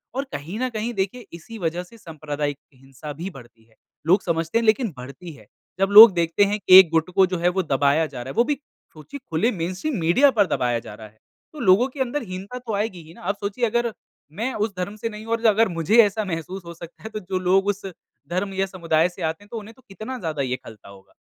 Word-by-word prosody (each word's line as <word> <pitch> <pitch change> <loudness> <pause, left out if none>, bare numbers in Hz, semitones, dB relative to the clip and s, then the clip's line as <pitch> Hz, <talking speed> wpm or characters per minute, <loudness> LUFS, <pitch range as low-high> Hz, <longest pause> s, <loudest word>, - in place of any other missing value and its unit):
और 270 - -1
कहीं 165 +10 -6
न 255 0 -1
कहीं 230 0 -4
देखिए 200 +4 -3
इसी 170 +7 -10
वज़ह 175 0 -2
से 230 +6 -17
सांप्रदायिक 150 -5 -5 0.2
हिंसा 135 +3 -10
भी 170 +6 -6
बढ़ती 120 -8 -15
है। 110 0 -29 0.3
लोग 185 +5 +4
समझते 165 +4 0
नहीं 230 - -2
लेकिन 220 -2 +2
बढ़ती 140 +7 -9
है। 140 - -17 0.3
जब 195 0 +2
लोग 215 +1 +11
देखते 170 +2 +2
हैं 205 +1 -1
एक 185 -2 +10
गुट 165 +2 +1
को 195 -1 +6
जो 180 -1 -3
है 175 +1 +2
वो - - +1
दबाया 145 +1 +2
जा 130 -4 -8
रहा 125 - -7
है - - -8
वो 235 - +6
भी, 290 +4 -1 0.4
सोचिए 160 - -10
खुले 180 +10 +1
मेनस्ट्रीम 185 - -3
मीडिया 230 - +4
पर 210 -5 +3
दबाया 120 -5 0
जा 110 -2 -11
रहा 110 0 -11
है 110 +1 -25 0.3
तो 305 - -10
लोगों 225 +2 +4
के 275 +1 -13
अंदर 265 +3 -1
हीनता 195 +5 -7
तो 235 -4 -6
आएगी 200 -4 -3
ही 160 +1 -15
ना। - - -16
आप 200 +3 -2
सोचिए 205 +4 -1
अगर 235 0 0 0.5
मैं 255 +4 -1
उस 210 -1 -2
धर्म 185 +3 -4
से 220 +2 -4
नहीं 215 0 -9
हूँ 225 - -7
और 230 0 -2
अगर 220 +1 +4
मुझे 170 +6 +1
ऐसा 210 +1 -1
महसूस 180 +1 -5
हो 170 - -8
सकता 170 0 -13
है 220 - -6
तो 215 - -5
जो 185 -1 -3
लोग 185 +2 +2
उस, 205 -1 -2 0.4
धर्म 185 +3 -2
या 190 0 0
समुदाय 170 -3 0
से 180 +1 -13
आते 160 +3 -3
हैं 205 - -20
तो 230 - -5
उन्हें 215 +2 -12
तो 260 - -22
कितना 215 +6 -7
ज़्यादा 155 -6 -3
ये 130 -2 -1
खलता 110 -3 -13
होगा। 95 0 -17
185 Hz, 250 wpm, -23 LUFS, 160-220 Hz, 0.5 s, लोग